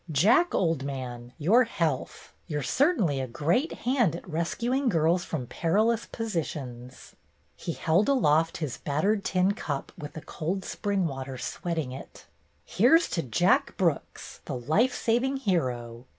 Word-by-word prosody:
"Jack, 210 - +4
old 165 -6 +1
man, 125 -3 -6
your 205 +11 +5
health! 165 - -3
You're 150 -4 -2
certainly 210 - +2
a 130 - -2
great 165 - 0
hand 240 - +2
at 175 - -9
rescuing 235 - 0
girls 170 -1 +2
from 145 -6 -4
perilous 215 - +1
positions." 140 - -5 0.4
He 170 - -4
held 170 - +2
aloft 165 - +3
his 150 -7 -4
battered 195 +9 0
tin 185 +1 +2
cup 150 -10 -4
with 150 0 -8
the 155 - -7
cold 185 +7 -4
spring 200 -3 -1
water 135 -3 -4
sweating 160 +1 -3
it. 130 - -10 0.4
"Here 245 - +5
's 340 - -1
to 165 - -1
Jack 165 +8 +2
Brooks, 170 -6 -2
the - - -4
life 160 - +2
saving 245 +4 +1
hero! 125 - -2
165 Hz, 145 wpm, -27 LUFS, 140-210 Hz, 0.4 s, your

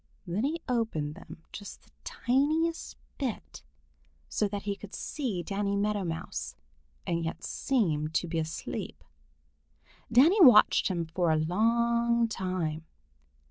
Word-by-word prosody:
Then 190 +7 -1
he 325 +3 -2
opened 225 - -1
them 160 - -12
just 205 - -9
the - - -26
tiniest 310 +6 0 0.2
bit, 260 -6 -4 0.7
so 210 - 0
that 200 0 -5
he 200 -1 -2
could 205 0 -10
see 230 - -3
Danny 200 +2 -1
Meadow 205 0 0
Mouse 65 - -5 0.5
and 170 0 -1
yet 165 - -4
seem 165 - 0
to 160 +2 -1
be 165 0 -1
asleep. 160 +1 -5 1.1
Danny 315 - +6
watched 245 -7 +7
him 170 -3 -1
for 165 +1 0
a 160 - +4
long 235 +7 +2
time. 180 -7 -3
200 Hz, 130 wpm, -29 LUFS, 165-235 Hz, 1.1 s, watched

